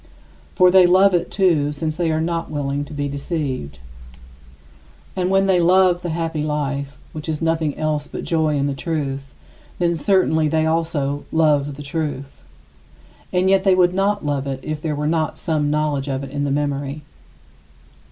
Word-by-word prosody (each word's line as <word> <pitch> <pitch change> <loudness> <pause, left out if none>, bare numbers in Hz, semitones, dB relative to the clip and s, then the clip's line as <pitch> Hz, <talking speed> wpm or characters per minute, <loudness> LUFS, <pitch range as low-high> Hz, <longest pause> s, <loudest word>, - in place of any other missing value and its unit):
For 180 0 +5
they 185 -1 +7
love 190 +2 +5
it, 175 0 0
too, 165 -7 +2
since 155 +1 -3
they 170 -1 0
are 155 - 0
not 165 +1 -2
willing 145 -1 -2
to 150 - -11
be 145 0 -2
deceived. 140 - -4 1.4
And 185 -1 0
when 195 0 +3
they 190 -2 +3
love 180 0 +4
the 175 - -4
happy 165 -1 -2
life, 140 -2 -3 0.2
which 155 +1 -6
is 155 -1 -2
nothing 160 -3 0
else 150 -1 -1
but - - -6
joy 160 -2 +1
in 140 - 0
the 140 - -1
truth, 135 -2 -4 0.5
then 170 -1 +1
certainly 160 -3 +2
they 155 +1 +1
also 160 -3 -1
love 145 -3 +2
the 145 - -9
truth. 145 - -4 0.9
And 180 +1 +2
yet 190 0 +4
they 190 -2 +4
would 180 -1 +3
not 200 -1 0
love 140 -2 -1
it 135 -1 -4
if 155 -1 -4
there 155 -2 -2
were 150 +1 -3
not 160 0 0
some 150 -3 -1
knowledge 150 -2 0
of 135 0 -2
it 135 - -8
in 145 0 -2
the - - -1
memory. 145 0 -2
155 Hz, 180 wpm, -21 LUFS, 145-170 Hz, 1.4 s, they